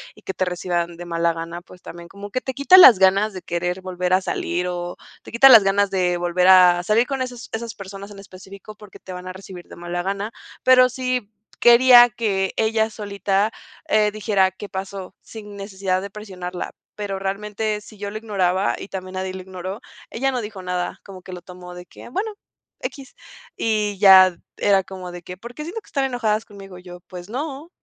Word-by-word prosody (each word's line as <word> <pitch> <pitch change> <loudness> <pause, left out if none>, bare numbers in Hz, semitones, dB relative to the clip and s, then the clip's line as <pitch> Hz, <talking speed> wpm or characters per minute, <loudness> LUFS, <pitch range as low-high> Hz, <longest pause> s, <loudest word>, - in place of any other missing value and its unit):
y - - -18
que 190 - -5
te 185 - 0
reciban 175 -1 -2
de 175 - -8
mala 170 0 0
gana, 165 +1 -7
pues, 180 0 -17
también 170 0 -10
como 200 +2 -10
que 255 +5 -3
te 265 - -5
quita 280 +8 +6
las 250 - +9
ganas 195 +3 +3
de 185 - -7
querer 175 +2 -3
volver 180 -1 -2
a 185 - +4
salir, 180 -1 -2
o 175 0 -5 0.3
te - - -12
quita 235 +4 +7
las 225 -5 +9
ganas 200 +1 +2
de 180 -2 0
volver 175 +1 +1
a 180 -1 +6
salir 215 +6 +2
con 270 -2 -2
esas 245 -2 -8
esas 225 0 -4
personas 195 +1 -10
en 200 - -11
específico, 195 +2 -12
porque 210 -1 -15
te 185 - -10
van 180 0 -8
a 185 - -6
recibir 185 -2 -11
de - - -12
mala 175 +1 -4
gana". 200 +3 -3 0.3
Pero 255 0 +6
sí 255 -3 -3 0.3
quería 240 0 +8
que 200 -4 -1
ella 220 0 +1
solita, 200 0 -1 0.4
eh, 210 -1 +3
dijera: 200 -3 +1
"¿Qué 200 +2 -10
pasó?", 190 0 -7
sin 210 -2 -11
necesidad 195 -2 -3
de 200 - -7
presionarla. 185 -4 -7 0.2
Pero 200 -2 -4
realmente 210 +2 -3
si 210 0 -15
yo 205 0 -4
lo 215 - -5
ignoraba, 195 -3 0
y - - -8
también 185 -1 -7
nadie 185 0 -3
lo 190 - -7
ignoró, 190 +3 -7 0.3
ella 270 +4 -1
no 250 -2 -2
dijo 210 -3 -8
nada, 180 -1 -3
como 190 -2 -11
que 185 - -12
lo 180 - -8
tomó 180 0 -11
de 180 0 -10
que: 180 - -13
"Bueno, 415 - -3 0.5
equis". 270 -2 -7 0.4
Y 210 -2 -1
ya 190 -2 +8 0.2
era 195 -1 +3
como 185 -1 -9
de 175 0 -9
que: 180 +1 -9
"¿Por 235 +4 -11
qué 300 - -6
siento 350 +8 -6
que - - -26
están 275 -2 -1
enojadas 225 -4 -1
conmigo?". 195 -3 -12
Y - - -17
yo: 180 -1 -11
"Pues 180 0 -10
no". 280 +5 -5
195 Hz, 210 wpm, -21 LUFS, 180-220 Hz, 0.5 s, las